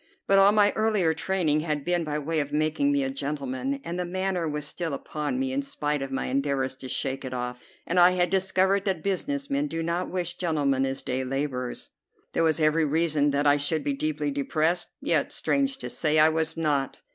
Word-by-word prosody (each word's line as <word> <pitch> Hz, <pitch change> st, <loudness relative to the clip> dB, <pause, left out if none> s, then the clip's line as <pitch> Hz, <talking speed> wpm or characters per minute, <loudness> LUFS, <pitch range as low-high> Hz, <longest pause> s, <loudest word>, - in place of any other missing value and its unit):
But 195 Hz, 0 st, +5 dB
all 195 Hz, +1 st, +7 dB
my 205 Hz, -1 st, +4 dB
earlier 210 Hz, -7 st, +2 dB
training 160 Hz, -2 st, +1 dB
had 150 Hz, -2 st, -2 dB
been 175 Hz, -1 st, +1 dB
by 150 Hz, -1 st, -2 dB
way 155 Hz, +2 st, -1 dB
of 145 Hz, -1 st, -2 dB
making 155 Hz, -, +1 dB
me 285 Hz, -1 st, +2 dB
a 270 Hz, -, -1 dB
gentleman, 150 Hz, -, -3 dB
and 175 Hz, +1 st, -4 dB
the -, -, 0 dB
manner 185 Hz, -2 st, -2 dB
was 150 Hz, 0 st, -4 dB
still 160 Hz, -1 st, -3 dB
upon 150 Hz, -, -3 dB
me 265 Hz, 0 st, -1 dB
in 275 Hz, -, 0 dB
spite 150 Hz, -, -2 dB
of 135 Hz, -, -3 dB
my 135 Hz, 0 st, -2 dB
endeavors 135 Hz, -1 st, 0 dB
to 130 Hz, -, -8 dB
shake 135 Hz, +1 st, -2 dB
it 130 Hz, -1 st, -5 dB
off, 125 Hz, 0 st, -4 dB, 0.2 s
and 180 Hz, +2 st, +1 dB
I 175 Hz, +1 st, +7 dB
had 180 Hz, -1 st, +1 dB
discovered 190 Hz, +1 st, +2 dB
that 185 Hz, -5 st, -1 dB
business 280 Hz, +9 st, -2 dB
men 285 Hz, +1 st, +1 dB
do 165 Hz, -, -3 dB
not 170 Hz, +2 st, -2 dB
wish 180 Hz, -1 st, -3 dB
gentlemen 140 Hz, -6 st, +1 dB
as 135 Hz, 0 st, -4 dB
day 130 Hz, +1 st, -2 dB
laborers. 130 Hz, -2 st, -3 dB, 0.4 s
There -, -, +1 dB
was 160 Hz, -1 st, +2 dB
every 155 Hz, +1 st, +3 dB
reason 155 Hz, -1 st, +2 dB
that 145 Hz, +1 st, 0 dB
I 145 Hz, 0 st, +5 dB
should 145 Hz, +1 st, -1 dB
be 140 Hz, -, 0 dB
deeply 150 Hz, +1 st, -2 dB
depressed; 155 Hz, +5 st, 0 dB
yet, -, -, +1 dB
strange 275 Hz, -1 st, 0 dB
to 270 Hz, -, -6 dB
say, 155 Hz, -1 st, +1 dB
I 155 Hz, +1 st, +7 dB
was 160 Hz, 0 st, -1 dB
not. 145 Hz, -4 st, 0 dB
160 Hz, 215 wpm, -26 LUFS, 145-185 Hz, 0.4 s, all